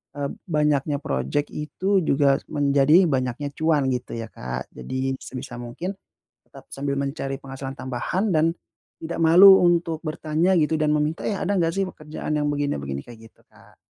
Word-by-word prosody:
eee, 140 -1 -2 0.2
banyaknya 150 -3 +1
projek 145 0 -2
itu 190 +6 0
juga 140 -1 +3
menjadi 145 +4 +4
banyaknya 130 +2 -2
cuan, 150 -3 +1
gitu, 125 -2 -4
ya, 115 -1 -6
Kak. 60 0 -6
Jadi 130 - -3
sebisa 125 -2 -8
mungkin 120 +10 -5 0.6
tetap - - -15
sambil 140 0 -2
mencari 140 -1 -3
penghasilan 135 0 -7
tambahan 175 - -2
dan 155 0 +4 0.6
tidak 170 +1 -4
malu 185 +4 +8
untuk 170 -2 +2
bertanya 160 +3 0
gitu 160 -1 +1
dan 155 - +2
meminta, 150 +2 0
iya, 200 -2 -2
"Ada 195 - 0
nggak 165 - +2
sih 195 - +1
pekerjaan 155 -4 -6
yang 145 - 0
begini-begini?" 70 - -2
kayak 115 -2 -13
gitu, - - -32
Kak. - - -22
145 Hz, 160 wpm, -24 LUFS, 135-165 Hz, 0.6 s, malu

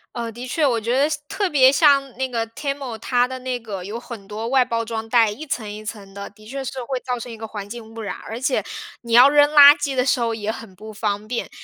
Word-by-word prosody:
呃， 235 -1 -4
的 240 +3 -8
确， 305 +4 +1
我 240 -4 +2
觉 235 +4 0
得 280 +2 +3
像 305 -1 -3
特 400 +2 -1
别 265 -4 +6
像 275 -1 +4
那 265 0 -1
个 230 -3 -2
TEMU， 275 0 -5
它 245 +2 +1
的 260 0 -6
那 255 -1 -3
个 205 -5 -7
有 210 +5 -6
很 235 -5 -10
多 215 +2 -5
外 255 0 +3
包 230 -1 -1
装 225 -1 -5
袋， 230 -2 +4
一 250 +10 -7
层 225 -7 -4
一 210 +1 -8
层 205 -3 -8
的， 200 0 -7
的 215 +1 -18
确 270 +3 -5
是 265 0 -5
会 255 +1 -3
造 250 -1 -3
成 240 +1 -8
一 225 - -9
个 225 - -7
环 205 -2 -7
境 225 0 -9
污 225 - -7
染， 210 - -4
而 225 - -6
且 260 +1 0 0.4
你 235 -1 -9
要 250 +4 +8
扔 290 0 +5
垃 290 -1 +9
圾 290 -1 -2
的 250 - +2
时 260 -1 +2
候 230 -1 0
也 215 -1 -3
很 225 -3 -10
不 215 +3 -10
方 210 -1 -3
便。 235 +1 -3
235 Hz, 305 characters per minute, -21 LUFS, 220-265 Hz, 0.4 s, 垃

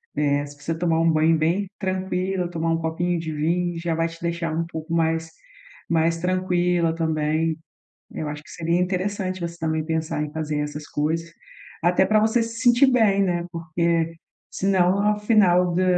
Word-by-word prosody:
eh, 145 -1 +1
se 145 0 -13
você 165 +2 -2
tomar 165 -1 +1
um 165 0 +3
banho 160 +1 +3
bem 175 +5 0
tranquila, 185 -1 -2
tomar 165 -1 -1
um 165 - +2
copinho 165 +2 -1
de 160 -1 -4
vinho, 170 +3 -1
já 170 0 -1
vai 165 +1 +1
te 165 0 -11
deixar 170 -1 -2
um 165 +1 -1
pouco 160 0 -6
mais, 165 0 0 0.6
mais 165 0 +2
tranquila 180 -1 +1
também. 160 0 0 0.5
Eu 155 - -4
acho 150 0 -7
que - - -18
seria 170 +1 0
interessante 185 +1 -1
você 170 0 -4
também 160 -2 -1
pensar 160 -2 -2
em 150 - -5
fazer 155 -1 -3
essas 150 0 -5
coisas, 160 +3 -1 0.5
até 180 +2 +3
pra 215 +2 +3
você 220 +2 +2
se 230 0 -6
sentir 245 +2 +5
bem, 210 -5 +3
né, 175 -2 0
porque 165 0 0 0.4
senão 190 0 +2
ao 210 0 +2
final 180 -5 +4
da 185 - +2
170 Hz, 175 wpm, -23 LUFS, 160-185 Hz, 0.6 s, sentir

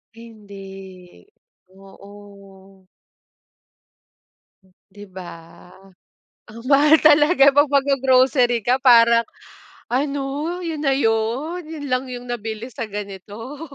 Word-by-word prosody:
Hindi. 195 - -14 0.4
Oo 195 -1 -17 2.0
'Di 205 +1 -13
ba? 175 -3 -13 0.8
Ang 230 +2 -12
mahal 295 +3 +5
talaga 295 -1 +5
'pag 290 +1 +4
maggro-grocery 260 -3 +2
ka 250 +4 +1
parang 235 -2 +5 0.7
"Ano? 285 +4 -3
Yun 320 -3 -5
na 275 - +2
'yon? 245 +9 -1
Yun 305 -3 -8
lang 255 +1 -1
yung 245 0 -8
nabili 225 -1 -5
sa 230 - -5
ganito?" 210 - -9
235 Hz, 90 wpm, -20 LUFS, 200-275 Hz, 2.0 s, mahal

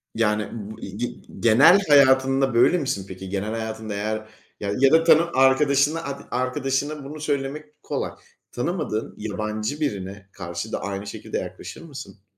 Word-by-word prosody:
Yani 105 -2 +1
b 110 -1 -7
ı - - -13 0.2
ı - - -8
ge 120 +1 -1 0.3
genel 135 - +7
hayatında 135 -2 +5
böyle 120 +9 +5
misin 130 - -2
peki? 95 0 -8
Genel 100 +2 -2
hayatında 110 -1 -4
eğer 110 +1 -3 0.3
ya 105 +8 +2
da 165 0 +6
tanı 165 +1 +5
arkadaşın 140 +3 +4 0.3
arkadaşına 135 +3 -1
bunu 150 +3 -8
söylemek 150 +1 -4
kolay. - - -3 0.4
Tanımadığın 130 - -3
yabancı 110 +5 -3
birine 100 -7 -4
karşı 90 +3 -6
da - - -3
aynı 100 +1 -4
şekilde - - -5
yaklaşır - - -7
mısın? 140 - -10
125 Hz, 145 wpm, -24 LUFS, 105-140 Hz, 0.4 s, genel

